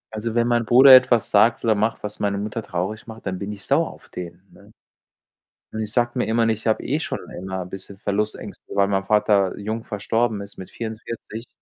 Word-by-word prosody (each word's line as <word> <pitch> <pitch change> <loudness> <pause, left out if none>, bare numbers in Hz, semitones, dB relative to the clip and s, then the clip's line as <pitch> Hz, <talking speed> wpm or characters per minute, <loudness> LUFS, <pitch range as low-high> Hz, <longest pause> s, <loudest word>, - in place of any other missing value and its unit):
Also, 110 +1 -4
wenn 120 - +3
mein 120 -1 +2
Bruder 130 +4 +8
etwas 130 -3 +4
sagt 110 +3 +4
oder 110 - +4
macht, 110 +2 -1
was 105 - -6
meine 100 -1 0
Mutter 105 +3 -4
traurig 105 +3 -4
macht, 110 0 -11
dann 95 -2 -3
bin 100 +1 -5
ich 100 -2 -7
sauer - - +2
auf - - -17
den, 90 0 -8
ne? - - -19 1.0
Und 110 - -3
ich 105 - -4
sage 120 0 +1
mir - - +1
immer, 115 +1 +2
ich 110 +1 -2
habe 110 - +1
eh - - -1
schon - - -3 0.2
immer 95 +1 -5
'n 90 - -12
bisschen 95 +1 -9
Verlustängste, 105 +2 -3
weil 100 0 +3
mein 95 -1 0
Vater 100 -2 +2
jung 110 +2 -4
verstorben 110 +1 -1
ist 100 0 -10
mit 95 - -9
44, 115 0 -7
110 Hz, 210 wpm, -22 LUFS, 100-115 Hz, 1.0 s, Bruder